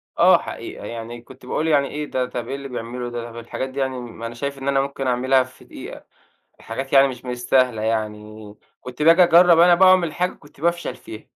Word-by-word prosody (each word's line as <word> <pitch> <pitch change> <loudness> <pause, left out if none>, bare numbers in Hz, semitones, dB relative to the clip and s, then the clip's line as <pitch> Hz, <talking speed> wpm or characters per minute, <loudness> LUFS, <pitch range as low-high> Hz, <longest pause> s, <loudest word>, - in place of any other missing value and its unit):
آه، - - +6
حقيقة - - -8
يعني 115 +1 -7
كنت 130 +1 -16
باقول 155 +5 -2
يعني 145 -3 +3
إيه 150 0 -5
ده، 130 -3 -2
طَب 120 -2 -6
إيه 135 - -4
اللي 140 0 -7
بيعملُه 120 -1 -6
ده؟ 120 -1 -5
طَب 115 - -12
الحاجات 120 +3 -5
دي 135 +2 -7
يعني 130 -1 -2
م 120 -2 -10
ما 115 - -7
أنا 115 - -9
شايف 140 +3 -4
إن 135 0 -7
أنا 135 -1 +2
ممكن 135 -1 -4
أعملها 130 +1 +2
في 130 0 -17
دقيقة، - - -10 0.6
حاجات 135 +4 -6
يعني 135 0 +6
مش 125 -2 -9
مستاهلة 125 -2 0
يعني، 110 -1 -4 0.3
كنت 125 +3 -7
بآجي 165 +3 +6
أجرّب 175 0 +6
أنا 175 +1 +7
بقى 185 +2 +5
وأعمل 180 -4 +4
حاجة 180 +3 -1
كنت 145 -1 -20
بافشل 170 +1 -1
فيها، 110 0 -11
130 Hz, 220 wpm, -21 LUFS, 120-145 Hz, 0.6 s, أنا